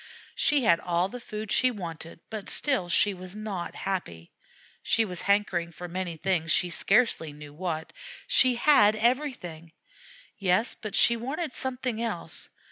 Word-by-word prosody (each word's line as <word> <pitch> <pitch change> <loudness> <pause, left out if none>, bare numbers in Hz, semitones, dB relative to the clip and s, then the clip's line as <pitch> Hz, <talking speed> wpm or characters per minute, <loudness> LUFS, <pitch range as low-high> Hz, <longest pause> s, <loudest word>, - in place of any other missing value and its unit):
She 290 -3 +2
had 170 -6 +4
all 175 +1 0
the 250 - -7
food 215 -2 -6
she 255 - +4
wanted, 165 -6 -7
but 215 -3 -6
still 260 -12 0
she 195 +4 +3
was 185 +1 -9
not 210 -5 -5
happy. 85 - -4 0.5
She 225 - +2
was 180 -4 -5
hankering 200 -4 +1
for 175 +2 -8
many 175 -1 -4
things, 165 -1 0
she 180 +1 +2
scarcely 195 -7 +2
knew 145 0 -11
what. 160 -1 -4 0.3
She 255 -1 +4
had 235 -5 +5
everything 220 - -1 0.7
yes, 195 +4 +2
but 215 -2 -7
she 235 - +5
wanted 275 +6 -4
something 250 -3 -2
else. 230 -1 -5
195 Hz, 150 wpm, -27 LUFS, 170-235 Hz, 0.7 s, had